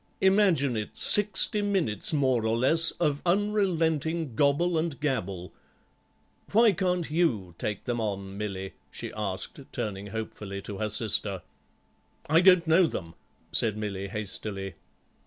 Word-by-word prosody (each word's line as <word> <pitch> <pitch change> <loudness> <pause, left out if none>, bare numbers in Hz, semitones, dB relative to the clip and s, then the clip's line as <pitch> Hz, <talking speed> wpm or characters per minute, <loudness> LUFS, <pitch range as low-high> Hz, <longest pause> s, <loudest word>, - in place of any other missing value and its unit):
Imagine 190 - +3
it, 105 -1 -5
sixty 210 +1 +4
minutes, 190 - +2
more 130 -6 +1
or 110 +1 +1
less, 160 +7 +4
of 150 -4 0
unrelenting 170 - 0
gobble 145 +6 +2
and 160 -3 -2
gabble. 100 -11 -3 1.0
Why 225 +1 +6
can't 180 -3 -1
you 120 - 0
take 105 -2 -3
them 120 -2 -2
on, 100 -2 -4
Milly?" 95 -2 -5 0.2
she - - -7
asked, 100 -3 -4
turning 100 -1 -4
hopefully 105 -2 -6
to 100 -2 -7
her 110 -1 -1
sister. 105 -3 -1 0.8
"I 160 +3 +4
don't 180 -2 +6
know 165 +2 +4
them," 85 - -6 0.4
said 110 -2 +1
Milly 100 -2 -4
hastily. 100 -1 -4
130 Hz, 130 wpm, -27 LUFS, 105-170 Hz, 1.0 s, Why